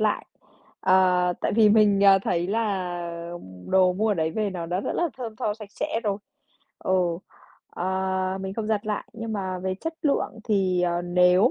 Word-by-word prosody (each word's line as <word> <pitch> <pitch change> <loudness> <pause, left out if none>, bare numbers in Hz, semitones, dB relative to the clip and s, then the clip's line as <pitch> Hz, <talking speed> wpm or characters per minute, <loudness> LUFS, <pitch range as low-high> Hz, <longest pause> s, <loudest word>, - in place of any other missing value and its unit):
lại, 215 -1 0 0.5
ờ, 180 -1 +4
tại - - 0
vì 220 0 +5
mình, 205 -2 +4
à, 195 -1 +8
thấy 175 -2 -1
là 200 -4 -1 0.7
đồ 185 -1 +4
mua 215 +4 0
ở 210 - +2
đấy 160 -1 0
về 210 +2 -1
nó 175 -3 -5
đã 180 +3 -1
rất - - -3
là 345 -1 +1
thơm 230 -4 -6
tho 210 - -1
sạch 215 -2 -11
sẽ 225 - -2
rồi. 205 -1 0 0.6
Ừ, 185 - -2 0.8
ờ, 190 +1 -1
mình 190 0 -5
không 220 0 -3
giặt 215 -1 -1
lại, 210 -1 -3
nhưng 225 0 -5
mà 190 -3 -3
về 185 +1 -2
chất 325 - -5
lượng 280 -6 0
thì, 190 -4 +1
ờ, 175 0 0
nếu 180 +5 +4
195 Hz, 190 wpm, -25 LUFS, 185-215 Hz, 0.8 s, à